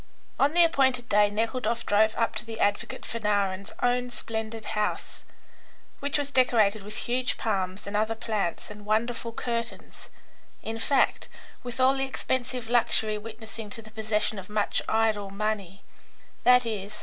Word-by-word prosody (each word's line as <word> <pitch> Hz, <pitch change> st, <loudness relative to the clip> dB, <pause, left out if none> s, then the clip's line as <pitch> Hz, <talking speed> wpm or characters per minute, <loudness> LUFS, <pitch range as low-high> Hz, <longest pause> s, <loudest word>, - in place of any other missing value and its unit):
On 285 Hz, +3 st, +4 dB
the 345 Hz, -, +8 dB
appointed 265 Hz, -7 st, +2 dB
day 205 Hz, -1 st, +4 dB
Nekhludoff 230 Hz, +2 st, -1 dB
drove 215 Hz, +1 st, +3 dB
up 230 Hz, -, +1 dB
to 215 Hz, -, 0 dB
the 225 Hz, -1 st, -7 dB
advocate 205 Hz, 0 st, 0 dB
Fanarin's 200 Hz, -3 st, -1 dB
own 245 Hz, 0 st, +2 dB
splendid 220 Hz, -2 st, -4 dB
house, 210 Hz, -1 st, -2 dB, 0.8 s
which 285 Hz, +1 st, 0 dB
was 285 Hz, -1 st, -2 dB
decorated 225 Hz, -6 st, +3 dB
with 210 Hz, +2 st, -7 dB
huge 250 Hz, +1 st, 0 dB
palms 190 Hz, -3 st, -2 dB
and 200 Hz, +1 st, -4 dB
other 215 Hz, +2 st, +1 dB
plants, 210 Hz, -5 st, -2 dB
and 210 Hz, 0 st, -10 dB
wonderful 230 Hz, +2 st, 0 dB
curtains, 235 Hz, 0 st, -5 dB, 0.5 s
in 225 Hz, +1 st, -4 dB
fact, 270 Hz, +4 st, +2 dB, 0.3 s
with 245 Hz, 0 st, -7 dB
all 260 Hz, +1 st, +6 dB
the 270 Hz, -, 0 dB
expensive 255 Hz, -2 st, -2 dB
luxury 220 Hz, -2 st, +2 dB
witnessing 220 Hz, 0 st, -8 dB
to 225 Hz, +2 st, -7 dB
the 215 Hz, -, -14 dB
possession 215 Hz, -1 st, -1 dB
of 185 Hz, -, -10 dB
much 210 Hz, -1 st, +1 dB
idle 220 Hz, -2 st, +1 dB
money, 200 Hz, -2 st, -3 dB, 0.6 s
i.e. 230 Hz, -5 st, +4 dB
220 Hz, 150 wpm, -27 LUFS, 210-245 Hz, 0.8 s, the